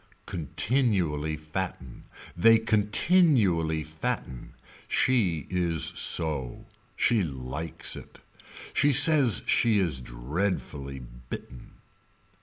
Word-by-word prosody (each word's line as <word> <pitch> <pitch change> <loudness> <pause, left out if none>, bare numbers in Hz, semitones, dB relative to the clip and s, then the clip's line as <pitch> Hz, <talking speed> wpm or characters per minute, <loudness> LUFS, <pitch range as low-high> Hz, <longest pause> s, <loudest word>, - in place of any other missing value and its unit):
Continually 85 - -1
fatten. 75 -5 -7 0.3
They 115 +6 +5
continually 105 - +2
fatten. 80 -5 -6 0.3
She 95 - +1
is 85 -4 0
so. 75 -7 0 0.3
She 115 -3 +1
likes 70 +1 -4
it. - - -13 0.5
She 145 0 +2
says 140 -3 +6
she 115 -3 +3
is 80 -10 0
dreadfully 70 +2 -4 0.3
bitten. 60 - -10
85 Hz, 80 wpm, -26 LUFS, 75-110 Hz, 0.5 s, says